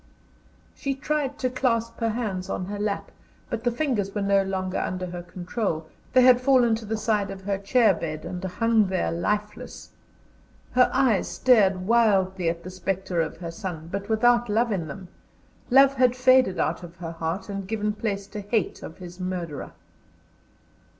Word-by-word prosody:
She 275 -1 -3
tried 285 0 -2
to 255 - 0
clasp 230 -3 -1
her 230 - +1
hands 210 -5 -3
on 185 - -2
her 205 +2 -5
lap, 205 -1 -2 0.4
but 225 - -3
the 245 - +3
fingers 235 -7 -1
were 205 - 0
no 200 0 +3
longer 190 -1 -2
under 185 0 -3
her 175 -1 -6
control; 175 -1 -3 0.3
they 255 0 +6
had 250 -1 +6
fallen 250 -3 +4
to 225 - -9
the 220 +1 -2
side 215 -2 0
of 195 -1 -8
the 200 -1 -1
chair 215 +1 +4
bed, 155 -2 -5
and 180 0 -6
hung 220 +3 +2
there 185 -1 -1
lifeless. 210 +5 -3 0.8
Her 250 0 +4
eyes 255 -7 +2
stared 195 -7 +3
wildly 190 -6 +3
at 170 0 -4
the 185 - -7
spectre 185 -2 -2
of 160 - -4
her 170 -2 -6
son, 165 -3 -6
but 200 +2 -4
without 240 +1 +3
love 225 +3 +2
in 175 -6 -2
them; 180 +4 -9 0.6
love 270 +2 +6
had 255 -2 +3
faded 255 -6 +4
out - - 0
of 175 -1 -11
her 165 -1 -6
heart, 165 +3 -4
and 195 -2 -5
given 210 0 -1
place 205 -2 -3
to 210 - -6
hate 205 -1 -1
of 160 - -9
his 175 0 -10
murderer. 180 -5 -4
200 Hz, 175 wpm, -25 LUFS, 185-235 Hz, 0.8 s, they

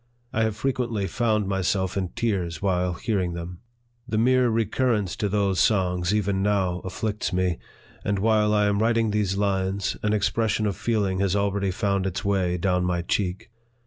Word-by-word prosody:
I 110 - +1
have 110 -2 +1
frequently 120 -5 -1
found 110 +1 0
myself 95 -1 0
in 95 -2 -1
tears 95 -9 -1
while 90 -1 0
hearing 95 -3 -1
them. 85 +1 -7 0.5
The 110 - -1
mere 125 +2 +4
re 115 0 +1
currence 105 -6 0
to 105 - -1
those 100 -2 +1
songs, 90 -3 +2
even 100 -2 0
now, 95 -3 +1
afflicts 105 +3 -3
me; 90 -1 0 0.4
and 100 0 0
while 105 +1 +3
I 105 -1 +3
am 100 0 +1
writing 115 -1 +2
these 100 -2 0
lines, 100 -1 0
an 105 - 0
expression 110 +1 +1
of 100 -3 0
feeling 100 -4 0
has 100 -1 +1
already 100 -1 0
found 100 0 0
its 95 +2 -4
way 95 -3 +1
down 90 0 +1
my 90 -1 0
cheek. 90 +2 -2
100 Hz, 175 wpm, -25 LUFS, 95-110 Hz, 0.5 s, mere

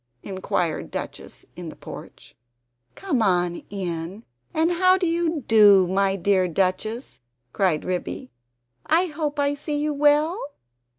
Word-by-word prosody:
inquired 185 -4 -2
Duchess - - -7
in - - -7
the - - -10
porch. - - -11 0.6
"Come 315 -12 -1 0.5
in! 180 +1 -5 0.3
and 320 +2 +1
how 370 +2 +4
do 375 - -1
you 335 -3 0
do, 205 -4 +7
my 195 +1 +1
dear 190 0 +2
Duchess?" 185 - -2 0.3
cried 180 -6 +1
Ribby. 130 - -4 0.6
"I 335 +4 +3
hope 300 -3 -3
I 285 0 +1
see 295 +1 -3
you 300 0 0
well?" 295 +6 +3
225 Hz, 125 wpm, -24 LUFS, 185-305 Hz, 0.6 s, do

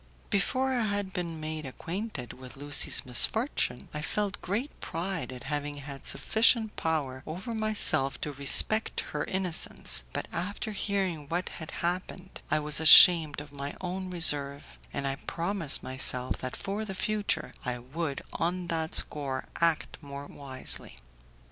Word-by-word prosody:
Before 260 +6 +1
I 240 -3 0
had 205 -2 -3
been 170 -3 -4
made 155 0 -5
acquainted 165 - -6
with 130 +1 -12
Lucie's 145 0 +1
misfortune 130 - +2
I 150 - -4
felt 200 +5 -2
great 225 +10 -4
pride 170 -2 -4
at 125 -1 -9
having 145 0 -4
had 140 -1 -8
sufficient 220 -1 +3
power 145 -5 -2
over 185 +9 -5
myself 215 -11 +1
to 150 - -3
respect 140 +10 +3
her 150 - -2
innocence; 180 - -1
but - - -4
after 200 +6 -4
hearing 190 -7 -2
what 175 +2 -2
had 160 - -9
happened 180 +1 -4
I 155 - +2
was 150 0 +1
ashamed 160 -2 +8
of 145 -1 -13
my 140 +1 -6
own 185 +1 -5
reserve, 140 - +2
and 140 - -4
I 135 0 -2
promised 170 -1 -1
myself 130 -1 +2
that 130 -1 -6
for 200 +2 -4
the 195 -3 -6
future 210 +1 -2
I 125 -1 -3
would 140 +4 -5
on 175 +1 -2
that 160 -1 -2
score 135 -3 -1
act 165 -2 0
more 140 -1 -8
wisely. 130 - +2
160 Hz, 150 wpm, -29 LUFS, 140-195 Hz, -, ashamed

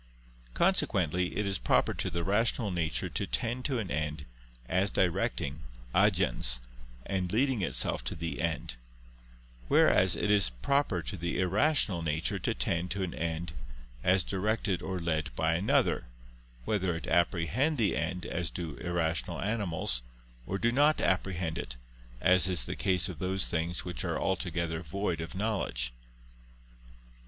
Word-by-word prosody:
Consequently 90 - +1
it 105 - 0
is 95 -2 -1
proper - - +2
to - - -2
the 85 0 -2
rational 105 +2 +1
nature 85 -3 -1
to - - -2
tend 120 +2 -1
to 135 -3 0
an 105 -6 -3
end, 75 -1 -2 0.4
as 95 +2 +2
directing 75 -5 0 0.3
(agens) - - +4 0.5
and 95 -2 -2
leading 125 +1 +2
itself 90 - +1
to - - -3
the 85 +1 -4
end: 80 -7 -2 0.9
whereas 90 +7 +5
it 105 - 0
is 100 -8 +5
proper 90 - 0
to 100 - -5
the 85 0 -2
irrational 100 - +2
nature 80 +5 -1
to 110 +5 -1
tend 90 -2 0
to 95 +2 -2
an 90 - -3
end, 80 0 -3 0.5
as 95 0 +4
directed 100 +1 -1
or 95 -1 -3
led 80 -3 -1
by 80 0 +1
another, 90 +5 +2 0.6
whether 95 -5 0
it 80 - -5
apprehend 90 - +1
the 110 -5 +2
end, 85 +3 -2
as 85 -1 -2
do 85 -4 -6
irrational 85 -1 -1
animals, 95 - 0 0.5
or 95 - -1
do 120 +3 +1
not 145 +5 +4
apprehend 90 -2 0
it, - - -6 0.4
as 90 +5 +5
is 90 -8 +1
the - - -4
case 90 -2 +1
of 90 -5 -7
those 95 +1 0
things 85 +1 -2
which 90 -2 -4
are - - -1
altogether 85 -1 -1
void 90 +1 -2
of 85 +3 -7
knowledge. 95 - -1
90 Hz, 150 wpm, -30 LUFS, 80-100 Hz, 0.9 s, whereas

